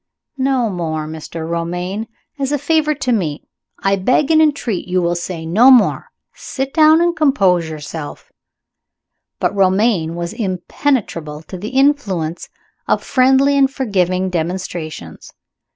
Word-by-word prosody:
"No 260 Hz, -3 st, +1 dB
more, 160 Hz, -4 st, -3 dB
Mr. 160 Hz, +1 st, -7 dB
Romayne! 175 Hz, +5 st, -3 dB, 0.3 s
As 275 Hz, 0 st, -1 dB
a 290 Hz, -, +1 dB
favor 305 Hz, +1 st, +1 dB
to 255 Hz, -3 st, -2 dB
Me, 165 Hz, -10 st, -1 dB, 0.3 s
I 195 Hz, 0 st, +1 dB
beg 255 Hz, -, +1 dB
and 315 Hz, 0 st, +5 dB
entreat 280 Hz, -, 0 dB
you 185 Hz, 0 st, +1 dB
will 175 Hz, -1 st, 0 dB
say 175 Hz, -1 st, -5 dB
no 215 Hz, +11 st, +5 dB
more. 255 Hz, -4 st, +4 dB, 0.3 s
Sit 270 Hz, 0 st, -5 dB
down 315 Hz, +1 st, +5 dB
and 345 Hz, 0 st, +1 dB
compose 195 Hz, -, +2 dB
yourself." 155 Hz, 0 st, -8 dB, 1.1 s
But -, -, 0 dB
Romayne 190 Hz, -3 st, +2 dB
was 170 Hz, +2 st, -4 dB
impenetrable 185 Hz, -, -2 dB
to 185 Hz, -, -10 dB
the 200 Hz, +4 st, -6 dB
influence 245 Hz, -, 0 dB, 0.4 s
of -, -, +1 dB
friendly 270 Hz, +2 st, +3 dB
and 275 Hz, -1 st, +4 dB
forgiving 185 Hz, -8 st, -1 dB
demonstrations. 165 Hz, -, -5 dB
190 Hz, 135 wpm, -17 LUFS, 170-270 Hz, 1.1 s, and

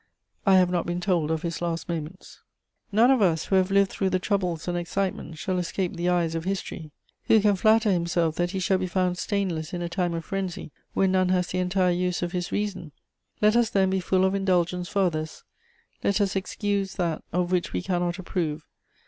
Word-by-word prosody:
I 195 Hz, -, +7 dB
have 180 Hz, -1 st, +4 dB
not 175 Hz, -2 st, -1 dB
been 175 Hz, 0 st, -2 dB
told 175 Hz, -4 st, 0 dB
of 160 Hz, -1 st, -1 dB
his 170 Hz, -1 st, -3 dB
last 170 Hz, -1 st, -2 dB
moments. 170 Hz, +2 st, -6 dB, 0.5 s
"None 230 Hz, +5 st, +5 dB
of 260 Hz, -4 st, +3 dB
us, 165 Hz, -5 st, +2 dB
who 195 Hz, -, 0 dB
have 185 Hz, 0 st, +2 dB
lived 195 Hz, 0 st, +3 dB
through 195 Hz, -, 0 dB
the 185 Hz, -, +1 dB
troubles 180 Hz, -4 st, -1 dB
and 175 Hz, -, -1 dB
excitements, 175 Hz, -2 st, -3 dB
shall 185 Hz, +2 st, -1 dB
escape 180 Hz, +1 st, -2 dB
the 175 Hz, +1 st, 0 dB
eyes 170 Hz, -2 st, +1 dB
of 165 Hz, 0 st, -3 dB
history. 185 Hz, -4 st, -4 dB, 0.4 s
Who 220 Hz, -, +5 dB
can 205 Hz, -1 st, +3 dB
flatter 215 Hz, +2 st, +4 dB
himself 170 Hz, -2 st, +1 dB
that 175 Hz, 0 st, +1 dB
he 190 Hz, -, -4 dB
shall 185 Hz, +1 st, +1 dB
be 185 Hz, -, -2 dB
found 180 Hz, 0 st, 0 dB
stainless 185 Hz, -5 st, -2 dB
in 175 Hz, -1 st, -3 dB
a 170 Hz, -, -3 dB
time 175 Hz, -1 st, -1 dB
of 165 Hz, -1 st, -5 dB
frenzy 190 Hz, -4 st, -4 dB, 0.2 s
when 190 Hz, -1 st, +3 dB
none 185 Hz, -1 st, +2 dB
has 180 Hz, -1 st, +1 dB
the 185 Hz, -, -2 dB
entire 180 Hz, 0 st, +2 dB
use 180 Hz, 0 st, -1 dB
of 175 Hz, -, -2 dB
his 180 Hz, -1 st, -3 dB
reason? 190 Hz, -7 st, -3 dB, 0.5 s
Let 210 Hz, +1 st, +5 dB
us 240 Hz, -2 st, +3 dB
then 190 Hz, -2 st, +2 dB
be 190 Hz, -, +1 dB
full 185 Hz, +1 st, +2 dB
of 190 Hz, -, +1 dB
indulgence 180 Hz, -2 st, 0 dB
for 200 Hz, -, +1 dB
others; 155 Hz, -3 st, -2 dB, 0.6 s
let 200 Hz, +1 st, +2 dB
us 200 Hz, -1 st, +1 dB
excuse 195 Hz, +1 st, -2 dB
that 170 Hz, -4 st, -2 dB
of 180 Hz, +1 st, 0 dB
which 180 Hz, -2 st, 0 dB
we 90 Hz, -, -2 dB
cannot 175 Hz, -1 st, -1 dB
approve. 165 Hz, -4 st, -3 dB
180 Hz, 215 wpm, -26 LUFS, 175-195 Hz, 0.6 s, I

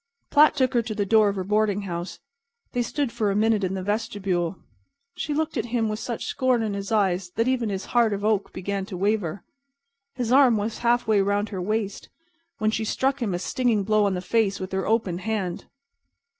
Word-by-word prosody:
Platt 300 Hz, +1 st, +6 dB
took 260 Hz, -1 st, +1 dB
her 240 Hz, -, +3 dB
to 220 Hz, -1 st, -5 dB
the 205 Hz, -1 st, 0 dB
door 215 Hz, 0 st, +4 dB
of 200 Hz, -, -3 dB
her 190 Hz, -, -2 dB
boarding 205 Hz, 0 st, +1 dB
house. 175 Hz, -1 st, -5 dB, 0.5 s
They 245 Hz, -, 0 dB
stood 270 Hz, +2 st, -1 dB
for 215 Hz, -3 st, 0 dB
a 195 Hz, -, 0 dB
minute 215 Hz, -1 st, +2 dB
in 190 Hz, 0 st, -1 dB
the 190 Hz, -, -4 dB
vestibule. 195 Hz, -4 st, -1 dB, 0.6 s
She -, -, -4 dB
looked 315 Hz, 0 st, -1 dB
at 230 Hz, -, -1 dB
him 230 Hz, -2 st, 0 dB
with 215 Hz, 0 st, -3 dB
such 235 Hz, 0 st, -4 dB
scorn 255 Hz, -3 st, +1 dB
in 215 Hz, -2 st, -2 dB
her 200 Hz, -, -3 dB
eyes 190 Hz, -4 st, +1 dB
that 230 Hz, +2 st, +1 dB
even 250 Hz, -4 st, +1 dB
his 195 Hz, -1 st, -3 dB
heart 235 Hz, -2 st, +4 dB
of 200 Hz, 0 st, -2 dB
oak 215 Hz, -2 st, +1 dB
began 200 Hz, +1 st, -3 dB
to 190 Hz, -, -6 dB
waver. 200 Hz, -2 st, -1 dB, 0.7 s
His 245 Hz, -2 st, -2 dB
arm 260 Hz, -4 st, +6 dB
was 210 Hz, +2 st, -3 dB
half 240 Hz, 0 st, +2 dB
way 215 Hz, -2 st, +3 dB
around 205 Hz, +2 st, +1 dB
her 190 Hz, -3 st, -4 dB
waist, 205 Hz, +1 st, -2 dB, 0.5 s
when 215 Hz, 0 st, +1 dB
she 220 Hz, -, -1 dB
struck 265 Hz, +5 st, 0 dB
him 205 Hz, -6 st, 0 dB
a -, -, 0 dB
stinging 225 Hz, +2 st, 0 dB
blow 215 Hz, +1 st, +3 dB
on 195 Hz, -2 st, +1 dB
the 180 Hz, -, -3 dB
face 205 Hz, 0 st, +1 dB
with 185 Hz, 0 st, -5 dB
her 190 Hz, 0 st, -2 dB
open 210 Hz, -6 st, 0 dB
hand. 190 Hz, -4 st, -3 dB
215 Hz, 215 wpm, -25 LUFS, 195-230 Hz, 0.7 s, Platt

